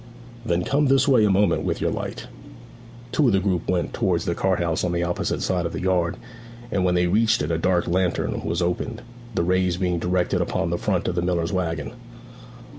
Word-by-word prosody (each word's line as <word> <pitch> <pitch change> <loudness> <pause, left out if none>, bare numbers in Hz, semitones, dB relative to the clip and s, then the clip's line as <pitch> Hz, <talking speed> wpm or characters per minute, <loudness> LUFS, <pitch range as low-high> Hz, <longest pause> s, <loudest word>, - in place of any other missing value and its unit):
'Then 90 -6 0
come 145 +8 +1
this 135 0 +3
way 130 -6 +5
a 105 - +4
moment 100 +2 +3
with - - -2
your - - 0
light.' - - -5 0.9
Two 150 - +3
of 115 - +3
the 95 - +4
group 90 -3 -1
went 90 -2 0
towards 85 -3 0
the 85 - 0
cart 95 +1 +1
house 85 -2 -1
on 90 -1 0
the 85 0 0
opposite 85 0 -2
side 90 -2 0
of 85 - -3
the - - -3
yard, 90 -2 +1 0.5
and 95 -2 0
when 90 -1 +2
they 90 0 +3
reached 110 0 +2
it 75 - -2
a 80 - +1
dark 90 0 +1
lantern 90 0 0
was 85 +1 -1
opened, 110 +7 -3 0.3
the - - +1
rays 90 0 +1
being 90 -2 0
directed 90 +1 0
upon - - -1
the - - 0
front - - -1
of - - 0
the 85 - -1
miller's 85 0 -1
waggon. 85 0 -2
90 Hz, 215 wpm, -23 LUFS, 85-95 Hz, 0.9 s, way